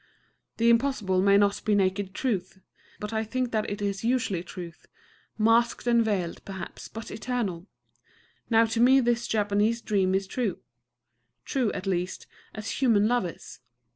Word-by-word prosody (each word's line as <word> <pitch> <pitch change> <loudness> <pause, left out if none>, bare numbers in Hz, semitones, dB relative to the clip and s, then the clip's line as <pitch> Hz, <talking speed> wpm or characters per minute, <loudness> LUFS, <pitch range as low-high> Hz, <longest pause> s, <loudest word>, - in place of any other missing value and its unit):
The 230 +1 +4
Impossible 230 -7 +1
may 200 +1 +5
not 200 0 +2
be 210 - +2
naked 190 0 0
truth; 195 -9 -2 0.4
but 210 +1 -5
I 220 0 0
think 245 +2 -2
that 215 -1 -1
it 205 0 -4
is 200 0 -2
usually 230 -7 0
truth, 175 -1 -10 0.5
masked 230 +3 +2
and 235 -1 +4
veiled, 190 -6 -2
perhaps, 190 -2 -8
but 225 +1 -8
eternal. 210 -7 -3 0.8
Now 225 -1 +5
to 225 +1 -2
me 260 +2 +6
this 240 -1 +1
Japanese 210 +2 +1
dream 190 -4 +1
is 195 0 0
true, 215 +1 -2 0.9
true, 255 -6 0
at 195 0 -5
least, 180 -1 -2 0.3
as 215 +5 -5
human 220 -5 +4
love 240 -5 +1
is. 170 - -11
210 Hz, 155 wpm, -27 LUFS, 195-235 Hz, 0.9 s, me